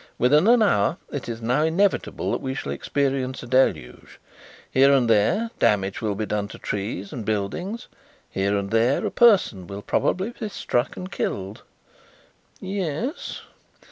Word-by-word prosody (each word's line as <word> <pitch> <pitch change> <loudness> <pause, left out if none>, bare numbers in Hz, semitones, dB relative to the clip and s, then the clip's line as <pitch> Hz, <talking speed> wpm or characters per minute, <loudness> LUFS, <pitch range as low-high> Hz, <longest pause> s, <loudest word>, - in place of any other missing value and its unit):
Within 150 - +4
an 235 -1 +6
hour 125 - +2
it 140 -4 -5
is 115 0 -6
now 125 +6 +2
inevitable 175 +6 +1
that - - -2
we 130 0 -3
shall - - -4
experience 135 -2 -1
a - - -7
deluge. 120 - 0 0.5
Here 135 +1 +5
and 135 -4 +3
there 140 - +2
damage 95 -2 +1
will 105 -3 -1
be 110 +2 -2
done 105 -1 -2
to - - -10
trees 100 -1 -4
and 115 - -5
buildings; 110 - -3 0.4
here 100 +1 0
and 100 0 -3
there 115 +4 +2
a - - -1
person 190 - +4
will 100 +1 -7
probably 190 +6 0
be 220 -3 -6
struck 125 -9 -2
and 185 +1 -7
killed." 95 +2 -3 1.0
"Yes." 190 - -4
130 Hz, 155 wpm, -24 LUFS, -, 1.0 s, an